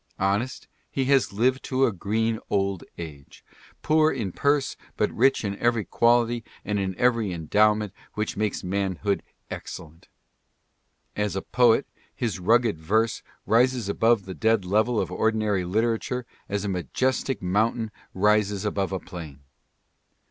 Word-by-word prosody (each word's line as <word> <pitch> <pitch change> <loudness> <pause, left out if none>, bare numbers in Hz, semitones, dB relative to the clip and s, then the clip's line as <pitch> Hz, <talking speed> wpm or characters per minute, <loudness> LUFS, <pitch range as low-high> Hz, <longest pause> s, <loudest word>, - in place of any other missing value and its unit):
Honest, 100 +7 -1 0.2
he 135 - -1
has 135 -1 +3
lived 125 +6 +1
to 135 0 +2
a - - +1
green 110 +4 -1
old 100 -3 0
age, 75 -5 -10 0.4
poor 155 0 +4
in 110 -8 -3
purse 140 +5 +1 0.2
but - - +1
rich 130 -1 +2
in 100 0 -2
every 120 -3 +1
quality 120 0 +2 0.2
and 105 0 -1
in 95 -2 -2
every 115 -5 +2
endowment 105 +5 +2 0.2
which 105 0 -2
makes 105 -1 -1
manhood 100 +1 -1 0.3
excellent. 80 +1 -8 1.1
As 105 -3 -1
a 95 - -2
poet, 120 +2 +3 0.3
his 115 -6 -2
rugged 110 -1 +3
verse 110 +7 +1 0.2
rises 120 -1 +3
above 110 0 +2
the 95 - -6
dead 110 -1 +1
level 110 +5 +2
of 90 - -2
ordinary 110 -1 +1
literature 115 +5 -1 0.2
as 100 0 -2
a - - -1
majestic 130 +8 -1
moun 105 +5 +1
tain 110 -2 -4 0.2
rises 105 0 +2
above 100 -2 -1
a 95 - -2
plain. 80 -7 -9
105 Hz, 140 wpm, -25 LUFS, 95-120 Hz, 1.1 s, poor